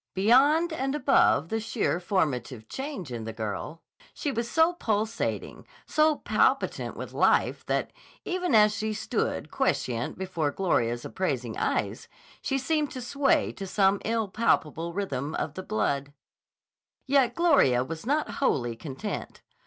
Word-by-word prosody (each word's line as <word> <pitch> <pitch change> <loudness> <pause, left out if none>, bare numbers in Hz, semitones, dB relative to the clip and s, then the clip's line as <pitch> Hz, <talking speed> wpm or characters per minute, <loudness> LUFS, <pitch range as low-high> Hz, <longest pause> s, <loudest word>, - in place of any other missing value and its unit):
Beyond 280 - +4
and 270 -2 -1
above 270 - +3
the 225 - -1
sheer 220 -5 -1
formative 135 - -1
change 265 - -6
in 115 -2 -4
the 115 - -4
girl, 110 +9 -5 0.3
she 290 - -2
was 235 -2 -2
so 325 +2 +4
pulsating, 220 -7 -2 0.2
so 310 0 +3
palpitant - - 0
with - - -7
life - - +2
that, - - -1 0.3
even 360 -7 0
as 210 -1 +6
she 215 +1 -2
stood 215 - -2
quiescent 120 -1 -1
before 180 -5 -1
Gloria's 120 -9 0
appraising 130 -11 -2
eyes, - - -1 0.3
she 270 - -1
seemed 295 +2 0
to 255 - -5
sway 280 +4 +1
to 195 - -7
some 195 0 +2
impalpable 205 -7 0
rhythm 165 -6 -3
of 145 - -3
the 185 - -5
blood. 140 - -1 0.9
Yet 270 -3 +3
Gloria 280 - +4
was 160 +4 -6
not 295 +5 0
wholly 120 - +1
content. 145 - -6
205 Hz, 135 wpm, -27 LUFS, -, 0.9 s, as